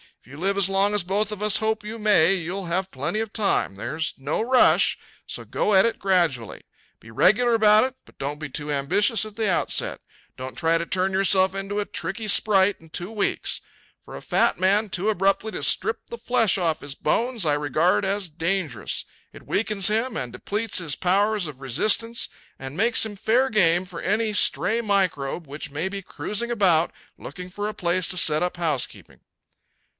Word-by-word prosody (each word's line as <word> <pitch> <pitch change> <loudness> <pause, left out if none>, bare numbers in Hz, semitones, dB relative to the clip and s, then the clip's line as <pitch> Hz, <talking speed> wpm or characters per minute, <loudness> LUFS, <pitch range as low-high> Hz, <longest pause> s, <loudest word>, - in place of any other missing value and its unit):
If - - -28
you 135 +3 -12
live 195 +4 -1
as 195 -1 +3
long 195 +1 +2
as 205 - +2
both 200 +4 -1
of 210 -1 -6
us 210 -2 +5
hope 220 -1 -1
you 215 +2 -7
may 200 -5 +4
you'll 185 +1 -4
have 185 +3 -2
plenty 145 +11 -3
of 220 -1 -4
time. 195 - +1
There's 150 +9 -3
no 140 +7 -2
rush, 250 +2 +4 0.3
so - - -5
go 210 - -1
at 190 - +6
it 230 - -1
gradually. 170 - 0 0.4
Be 110 - -16
regular 235 - +3
about 215 -1 +5
it, 260 - -6
but - - -21
don't 145 +2 -4
be 155 -1 -6
too 150 +2 -5
ambitious 200 +11 +2
at 215 -1 -11
the 220 -2 -1
outset. 180 - 0 0.4
Don't 130 -1 -8
try 165 +3 +2
to 170 - -3
turn 190 +1 0
yourself 190 0 +3
into 195 +1 -3
a 205 - -1
tricky 220 +1 -4
sprite 200 -1 +4
in 160 - -18
two 175 +5 -5
weeks. 210 -3 -1 0.4
For - - -10
a - - -8
fat - - +1
man 200 +3 +2
too 190 +3 -1
abruptly 195 +2 0
to - - -6
strip 450 - +2
the 470 - -7
flesh 230 -5 +2
off 165 -4 -1
his 145 -1 -7
bones 235 - -1
I 150 - +2
regard 150 +6 +1
as 195 -1 -2
dangerous. 165 - -3 0.3
It - - -14
weakens 205 -3 +1
him 225 +4 0
and 120 -2 -5
depletes 210 0 -2
his 155 -5 -2
powers 200 +2 +1
of 145 -4 -8
resistance 215 - +1 0.3
and 135 +3 -8
makes 230 +2 +3
him 210 -2 -7
fair 240 +6 +1
game 180 -4 +2
for 180 -2 -8
any 215 +3 0
stray 220 +2 +1
microbe 185 -8 -1
which 145 +1 -7
may 160 +6 -3
be 195 0 -6
cruising 210 +4 -3
about 180 -7 +2 0.3
looking 180 -1 -9
for 205 +2 -4
a 215 - -4
place 175 0 0
to 185 - -1
set 155 -3 +3
up 180 0 -2
housekeeping." 155 -7 -3
195 Hz, 195 wpm, -23 LUFS, 165-215 Hz, 0.4 s, at